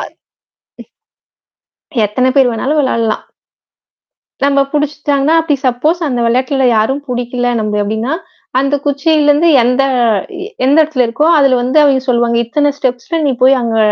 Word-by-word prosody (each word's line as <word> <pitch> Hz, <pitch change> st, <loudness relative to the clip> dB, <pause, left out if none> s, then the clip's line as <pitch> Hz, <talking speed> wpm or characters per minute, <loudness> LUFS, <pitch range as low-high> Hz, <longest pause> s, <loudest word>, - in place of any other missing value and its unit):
ம். -, -, -8 dB, 1.9 s
எத்தன 255 Hz, +5 st, 0 dB
பேர் 265 Hz, -2 st, +4 dB
வேணாலும் 270 Hz, +7 st, -2 dB
விளையாடலாம். 230 Hz, -5 st, -1 dB, 1.2 s
நம்மள 280 Hz, 0 st, +2 dB
பிடிச்சிட்டாங்கனா, 295 Hz, 0 st, 0 dB
அப்படி 310 Hz, -3 st, 0 dB
சப்போஸ் 300 Hz, +8 st, 0 dB
அந்த 250 Hz, -3 st, -2 dB
விளையாட்ல 260 Hz, +2 st, 0 dB
யாரும் 265 Hz, +7 st, 0 dB
புடிக்கல 245 Hz, 0 st, -3 dB
நம்ப 215 Hz, -1 st, -2 dB
அப்டின்னா, 220 Hz, +7 st, -3 dB, 0.5 s
அந்த 275 Hz, +1 st, 0 dB
குச்சியில 295 Hz, +1 st, +1 dB
இருந்து 310 Hz, +4 st, +3 dB
எந்த 250 Hz, +3 st, +1 dB, 0.6 s
இ -, -, -7 dB, 0.2 s
எந்த 275 Hz, -, +3 dB
இடத்துல 290 Hz, -5 st, 0 dB
இருக்கோ, 230 Hz, +7 st, -1 dB
அதுல 270 Hz, -3 st, +3 dB
வந்து 255 Hz, +5 st, -1 dB
அவிங்க 270 Hz, -2 st, +2 dB
சொல்லுவாங்க. 235 Hz, -1 st, +1 dB
இத்தனை 290 Hz, +5 st, 0 dB
ஸ்டெப்ஸ்ல 260 Hz, +5 st, -3 dB
நீ -, -, +1 dB
போய் 265 Hz, +1 st, +5 dB
அங்க 230 Hz, -1 st, -2 dB
265 Hz, 140 wpm, -13 LUFS, 245-290 Hz, 1.9 s, போய்